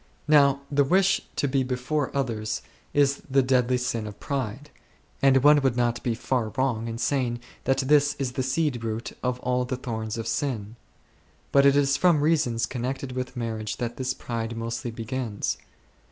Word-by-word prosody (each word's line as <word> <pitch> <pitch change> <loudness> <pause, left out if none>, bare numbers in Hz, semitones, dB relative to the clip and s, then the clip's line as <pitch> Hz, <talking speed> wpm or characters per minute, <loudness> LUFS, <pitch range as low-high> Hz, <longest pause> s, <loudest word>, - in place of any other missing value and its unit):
Now 140 -2 +5
the 145 0 +4
wish 190 +6 +3
to 145 - +1
be 135 0 +1
before 130 +3 -1
others 110 -5 -2 0.3
is 140 -1 +2
the 135 0 +4
deadly 125 -1 +2
sin 120 -3 -2
of 105 - -9
pride, 140 +1 -4 0.5
and 135 -1 +5
one 145 0 +7
would 130 -3 +1
not 120 -1 +1
be 120 -2 -1
far 120 -1 -1
wrong 120 -4 0
in 115 0 -4
saying 120 -1 0 0.3
that 135 0 +2
this 145 +1 +4
is 135 -3 -2
the 130 - -2
seed 130 -2 0
root 115 +1 -3
of 125 0 -1
all 125 0 +1
the 125 +1 -3
thorns 110 -3 -4
of 115 - -4
sin; 115 -3 -2 0.8
but.it 140 0 +5
is 140 -1 +3
from 175 -5 +4
reasons 145 -7 +2
connected 130 +1 -4
with 125 0 -5
marriage 110 -3 -3
that 120 -1 -4
this 130 0 -2
pride 115 -1 -4
mostly 115 +2 -3
begins. 115 -1 -3
125 Hz, 170 wpm, -26 LUFS, 115-140 Hz, 0.8 s, one